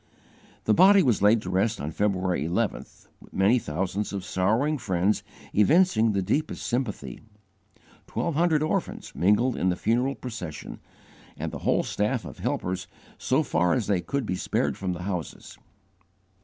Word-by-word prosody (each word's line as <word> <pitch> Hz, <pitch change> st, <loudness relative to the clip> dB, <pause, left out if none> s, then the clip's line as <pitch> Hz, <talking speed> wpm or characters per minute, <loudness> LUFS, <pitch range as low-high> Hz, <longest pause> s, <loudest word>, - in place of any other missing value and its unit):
The 110 Hz, -, +3 dB
body 195 Hz, -, +7 dB
was 120 Hz, -9 st, +2 dB
laid 105 Hz, +2 st, +4 dB
to 90 Hz, -, -4 dB
rest 105 Hz, +5 st, +1 dB
on 75 Hz, +2 st, -4 dB
February 95 Hz, -4 st, 0 dB
11th, 95 Hz, +6 st, -3 dB, 0.3 s
many 100 Hz, +6 st, +3 dB
thousands 95 Hz, +4 st, -3 dB
of 95 Hz, -2 st, -5 dB
sorrowing 115 Hz, +12 st, +1 dB
friends 95 Hz, 0 st, 0 dB, 0.3 s
evincing 115 Hz, -, +4 dB
the 100 Hz, -1 st, 0 dB
deepest 150 Hz, +11 st, -1 dB
sympathy. 105 Hz, -, -3 dB, 0.9 s
Twelve 170 Hz, -, -2 dB
hundred 160 Hz, -1 st, +2 dB
orphans 155 Hz, -, -3 dB
mingled 105 Hz, +7 st, +2 dB
in 95 Hz, -, +1 dB
the 90 Hz, -, +1 dB
funeral 125 Hz, +7 st, 0 dB
procession, 110 Hz, -12 st, -7 dB, 0.6 s
and -, -, -4 dB
the -, -, -6 dB
whole -, -, +1 dB
staff 110 Hz, +4 st, -1 dB
of -, -, -10 dB
helpers 90 Hz, +1 st, -2 dB, 0.3 s
so 135 Hz, +5 st, +1 dB
far 90 Hz, -, +1 dB
as 120 Hz, -5 st, 0 dB
they 95 Hz, -4 st, +1 dB
could 140 Hz, +3 st, -2 dB
be 95 Hz, -, -2 dB
spared -, -, -1 dB
from 95 Hz, -2 st, -3 dB
the 90 Hz, 0 st, -6 dB
houses. 90 Hz, -6 st, -5 dB
105 Hz, 155 wpm, -26 LUFS, 90-125 Hz, 0.9 s, body